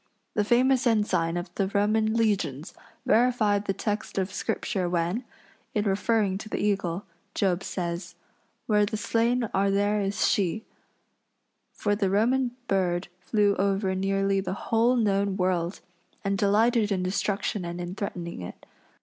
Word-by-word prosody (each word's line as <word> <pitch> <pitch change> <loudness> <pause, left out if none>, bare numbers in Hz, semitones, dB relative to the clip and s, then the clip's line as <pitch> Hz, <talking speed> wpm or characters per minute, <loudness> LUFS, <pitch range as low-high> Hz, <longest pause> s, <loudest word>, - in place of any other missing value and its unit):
The 210 - +1
famous 250 +3 +3
ensign 180 -7 +1
of 175 +2 -5
the 195 - 0
Roman 215 +2 +1
legions 185 - 0 0.3
verified 215 -3 +3
the 195 - 0
text 210 +2 -3
of 190 0 -1
Scripture 185 -2 -2
when, 175 +7 -1 0.5
in 210 0 +1
referring 200 -1 +1
to 215 - -8
the - - -2
eagle, 195 -3 -1 0.3
Job 190 -2 +1
says: 175 -1 -4 0.5
"Where 210 -1 +3
the 210 +1 -1
slain 235 +3 +1
are 195 +1 +2
there 205 +1 +1
is 195 0 +1
she," 200 +2 0 1.1
for 205 -1 0
the 200 -2 0
Roman 245 +6 +2 0.2
bird 180 -2 0
flew 205 +1 +2
over 195 0 +1
nearly 195 +1 +1
the 190 - -3 0.2
whole 235 +3 +4
known 200 -4 +1
world 180 -1 0 0.4
and 195 0 0
delighted 210 +2 +3
in 185 -2 0
destruction 200 +1 -1
and 170 0 -5
in 175 0 -4
threatening 175 - -5
it. 90 - -9
200 Hz, 145 wpm, -27 LUFS, 185-215 Hz, 1.1 s, whole